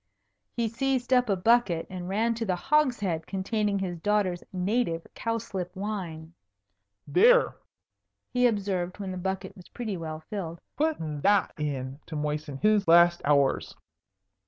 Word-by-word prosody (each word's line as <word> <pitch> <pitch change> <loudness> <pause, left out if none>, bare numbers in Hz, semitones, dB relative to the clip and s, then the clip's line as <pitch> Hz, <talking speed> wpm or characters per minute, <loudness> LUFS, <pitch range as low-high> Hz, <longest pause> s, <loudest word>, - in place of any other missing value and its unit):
He 235 -1 +1
seized 260 +2 0
up 250 -2 +3
a 200 - +3
bucket 190 -4 +2
and 180 -1 -6
ran 225 +4 +1
to 230 0 -3
the 190 -5 0
hogshead 210 - +1
containing 205 +1 -1
his 180 -3 -3
daughter's 200 -2 0
native 185 -2 -1
cowslip 210 -6 -4
wine. 180 -6 -5 0.7
"There!" 480 +6 +5 0.8
he 250 0 +4
observed 195 -5 -1
when 195 -2 -4
the 185 - -5
bucket 190 +1 -4
was 180 -4 -15
pretty 220 -6 -4
well 155 -1 -6
filled. 170 -5 -5 0.2
"Put 315 +1 +1
that 160 +6 +1
in 140 -2 -4
to 160 - -6
moisten 150 -1 -3
his 210 +3 +2
last 170 +1 +6
hours." 140 -2 +2
190 Hz, 140 wpm, -27 LUFS, 165-225 Hz, 0.8 s, last